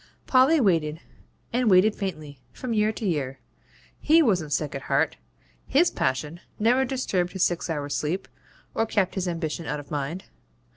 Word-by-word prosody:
Polly 270 +5 +5
waited, 165 - +1 0.5
and 245 -1 +2
waited 195 +3 +5
faintly, 155 -8 -5
from 245 - -4
year 215 0 +2
to 220 - -6
year. 140 -7 -1 0.6
HE 320 +2 +5
wasn't 180 - +1
sick 150 -1 -1
at 135 - -4
heart; - - 0 0.5
HIS 330 +6 +3
passion 150 +6 -2 0.2
never 245 +5 +3
disturbed 200 -9 -1
his 190 -2 +1
six 175 0 0
hours' 145 -3 -2
sleep, 165 +6 -2 0.5
or 225 - 0
kept 200 -4 +1
his 190 -2 -2
ambition 165 -2 -3
out 150 - -2
of 145 - -12
mind. 150 +5 -3
180 Hz, 160 wpm, -25 LUFS, 150-225 Hz, 0.6 s, Polly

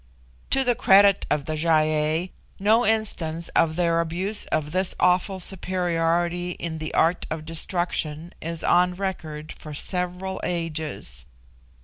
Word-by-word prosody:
To 270 - +3
the 245 -1 +3
credit 200 -3 +5
of 150 -1 0
the 155 - -3
Gy 155 +2 -1
ei 155 +2 +2 0.3
no 220 +4 +4
instance 170 -8 0
of 160 -1 +2
their 170 -1 +2
abuse 185 +6 -2
of 150 -1 -1
this 185 +1 +1
awful 180 +2 +2
superiority 175 -1 0
in 160 -2 -5
the 155 0 -4
art 170 +2 +2
of 155 0 -5
destruction 165 -1 -2
is 165 0 -4
on 180 0 +3
record 160 -5 -5
for 150 -1 -9
several 180 +3 -3
ages. 155 - -4
170 Hz, 135 wpm, -24 LUFS, 155-185 Hz, 0.3 s, credit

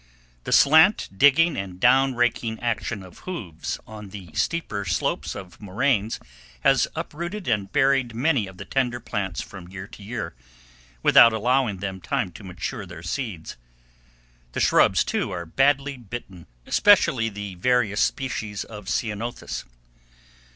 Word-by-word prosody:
The - - -4
slant 160 +8 +6
digging 145 - +5
and 95 -2 -5
down 130 +3 +4
raking 120 -2 0
action 115 -4 -2
of 90 -2 -14
hoofs 95 - -5
on 105 -2 -10
the 95 -5 -10
steeper 105 - -1
slopes 85 -3 -1
of 90 -1 -10
moraines 105 +2 0 0.4
has - - +4
uprooted 175 +5 -5
and 100 -2 0
buried 135 -4 +2
many 130 -4 +1
of 95 -1 -12
the 100 - -8
tender 125 -2 0
plants 95 -5 -3
from 95 -7 -10
year 95 +1 -8
to 100 - -14
year, 100 -5 -5 0.7
without 115 - +8
allowing 120 -1 +1
them 95 0 -5
time 90 - -1
to 100 - -12
mature 95 +4 -5
their 85 -2 -10
seeds. 90 - -5 1.0
The - - -2
shrubs, - - +4
too, - - -1
are 85 -1 -5
badly 135 - +1
bitten, 100 -6 -9 0.2
especially 135 - +4
the 100 -2 -6
various 110 +1 +1
species 110 -6 -2
of 105 -3 -11
ceanothus. 115 0 -3
110 Hz, 140 wpm, -24 LUFS, 95-130 Hz, 1.0 s, without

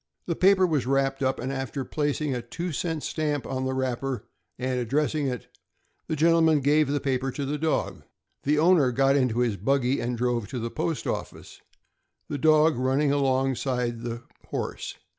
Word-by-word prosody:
The 170 - -1
paper 190 +1 +5
was 150 -8 0
wrapped 135 0 +1
up, 130 0 0
and 130 +3 -3
after 135 0 -4
placing 145 -1 -1
a 125 - -2
two 170 +10 -5
cent 160 0 -2
stamp 150 -3 -2
on 130 0 -3
the 130 - -1
wrap 130 -2 -1
per 135 -5 -3 0.3
and 130 0 -1
addressing 145 +4 0
it, 125 -2 -4 0.6
the 155 - -1
gentleman 160 -1 +4
gave 150 +2 +3
the 145 0 +1
paper 135 -1 -1
to 140 +2 -4
the 145 +2 -2
dog. 160 +1 -1 0.4
The 150 +2 +1
owner 160 -5 +4
got 135 +2 +3
into 125 -4 +2
his 115 -5 0
buggy 130 +5 +1
and 120 0 -2
drove 120 -3 0
to 130 - -5
the 115 0 -3
post 165 -3 -2
office, - - -5 0.7
the 145 - -3
dog 155 0 +4
running 135 +3 +2
alongside 130 -3 0
the 120 0 -5 0.2
horse. - - -4
135 Hz, 180 wpm, -26 LUFS, 125-150 Hz, 0.7 s, paper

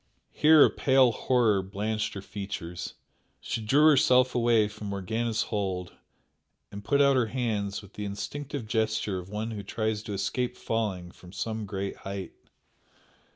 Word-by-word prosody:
Here 155 0 +7
a - - +2
pale 130 -2 +4
horror 115 -5 +2
blanched 105 +3 -3
her 100 - -6
features 95 -4 -6 0.4
she 115 - -4
drew 140 +8 +4
herself 130 -4 +5
away 115 -3 +3
from 105 0 -8
Morgana's 110 +4 -1
hold 95 -3 -3 0.8
and 100 0 -8
put 140 +5 +3
out 140 -1 +4
her 125 -3 +2
hands 110 -5 -2
with 100 - -15
the 105 - -5
instinctive 140 +6 -5
gesture 110 -3 -1
of 90 +1 -10
one 110 +2 -3
who 105 -2 -5
tries 110 +1 -2
to 105 - -6
escape 120 +6 -2
falling 95 -6 -2
from 90 0 -15
some 110 +1 -4
great 95 0 -4
height. 95 -1 -6
110 Hz, 155 wpm, -28 LUFS, 100-120 Hz, 0.8 s, Here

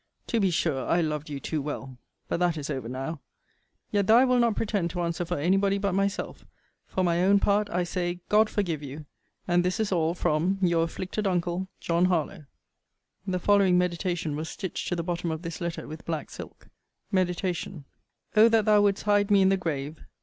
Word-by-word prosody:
To 230 - 0
be 195 -3 +3
sure 155 -6 0
I 170 - +3
loved 150 -1 -2
you 145 -2 -4
too 155 +2 -3
well. 135 -3 -6 0.3
But - - -1
that 175 -2 +1
is 145 - -4
over 130 -4 -4
now. 135 +4 -5 0.7
Yet, 200 -2 +1
though 225 - +7
I 255 - +6
will 250 -1 +3
not 235 -3 +3
pretend 205 -6 -1
to 175 +1 -3
answer 170 0 -2
for 175 +1 -2
any 175 +7 +2
body 200 0 +2
but 200 -1 -1
myself, 195 +1 -2 0.4
for 185 - -1
my 175 0 +2
own 200 +2 +5
part 205 +1 +2
I 180 +1 0
say 175 0 -2
God 215 +1 +4
forgive 170 -8 -1
you! 145 +2 -8 0.4
and 175 0 +3
this 180 +4 -1
is 220 -2 0
all 165 -2 +1
from 175 +3 +1
Your 170 -3 +2
afflicted 185 +5 -3
uncle, 180 0 -1
JOHN 170 +1 +1
HARLOWE. 175 -2 -1 0.8
The 185 -1 0
following 195 -1 +4
MEDITATION 175 -3 -1
was 155 +2 -4
stitched 190 -3 -5
to 175 - -1
the 170 - -2
bottom 175 0 -2
of 160 +1 -4
this 165 +1 -6
letter 170 -1 -4
with 155 +1 -9
black 160 -3 -4
silk. - - -11 0.4
MEDITATION 180 -4 -1 0.5
O 220 +2 +7
that 225 -2 +3
thou 210 -1 +5
wouldst 200 -1 +1
hide 205 0 +2
me 200 -2 +5
in 190 - +5
the 195 - +4
grave! 155 -4 -4
175 Hz, 205 wpm, -27 LUFS, 160-195 Hz, 0.8 s, though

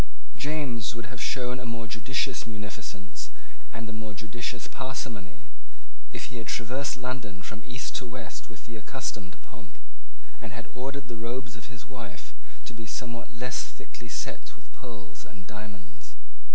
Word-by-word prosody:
James 130 -7 +4
would 115 -1 0
have 120 - -1
shown 125 +2 +5
a - - -1
more 115 0 +2
judicious 115 +4 +4
munificence 105 -2 -2 0.4
and 115 0 -1
a 110 - -1
more 110 -1 -1
judicious 115 +2 +1
parsimony, 120 -7 -1 0.7
if - - -1
he - - 0
had - - -4
traversed 130 +4 +4
London 125 -7 0
from 105 +3 -2
east 125 +1 +1
to 125 - +1
west 115 -2 -2
with 110 -2 -8
the 115 - -5
accustomed 105 -4 0
pomp, - - -9 0.6
and 115 -3 -2
had 115 -1 -2
ordered 135 +2 +1
the 115 -2 -2
robes 120 0 +2
of 115 +1 -5
his 120 -3 -6
wife 120 -8 -4 0.3
to - - -2
be 115 -1 -3
somewhat 120 0 0
less 125 +1 +4
thickly - - -5
set - - 0
with - - -18
pearls 100 -9 -5
and 100 -3 -8
diamonds. 100 -7 -6
115 Hz, 160 wpm, -34 LUFS, 105-125 Hz, 0.7 s, shown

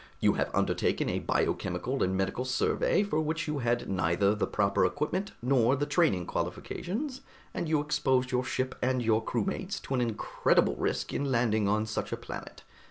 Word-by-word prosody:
You - - +4
have - - -1
undertaken - - +1
a - - -1
biochemical - - -1
and 95 0 +1
medical 95 +6 -1
survey 130 +9 +1
for 160 -6 0
which 160 +2 -2
you 150 -1 -1
had 120 -1 0
neither 95 +2 +2
the 105 - -1
proper 100 -1 +1
equipment 180 +7 -1
nor 125 0 +3
the 145 +1 -1
training 145 - +2
qualifications, 260 - -3 0.3
and 165 - -3
you 155 -1 +3
exposed 130 -3 +1
your 125 0 +1
ship 130 +1 -2
and 130 -1 +1
your 110 0 +2
crewmates 190 - -2
to - - -5
an 130 - +2
incredible 115 -3 +1
risk - - -1
in 140 -1 -1
landing 110 -4 +2
on 105 +2 +1
such 110 - -3
a - - -2
planet. - - -8
130 Hz, 175 wpm, -29 LUFS, 110-150 Hz, 0.3 s, You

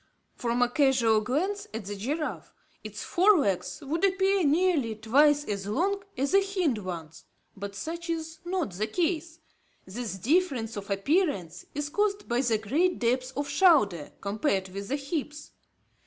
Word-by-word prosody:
From 240 0 0
a - - +3
casual 245 -5 +3
glance 360 - -1
at 225 -3 -5
the 205 +1 -5
giraffe, 290 +10 -3 0.3
its - - -7
fore 385 +3 +4
legs 200 - -1
would 320 +6 -2
appear 390 0 +3
nearly 300 -6 +2
twice 290 +7 +3
as 200 -1 -3
long 390 - 0 0.2
as 275 +2 0
the 395 +1 +5
hind 365 - 0
ones, 165 -5 -7 0.3
but 200 0 -7
such 335 - -5
is 320 -1 -4
not 350 - -2
the 205 +5 -2
case. 330 +3 -1 0.5
This 210 +2 -5
difference 260 - +1
of 200 -1 -7
appearance 200 - 0
is 295 0 -2
caused 410 +3 0
by 240 0 +1
the 235 -4 +2
great 305 - +1
depth 255 +2 0
of 285 0 -1
shoulder, 285 - +3
compared 200 -2 -1
with 200 +2 -6
the 275 - 0
hips. 295 +1 -5
275 Hz, 155 wpm, -28 LUFS, 215-340 Hz, 0.5 s, the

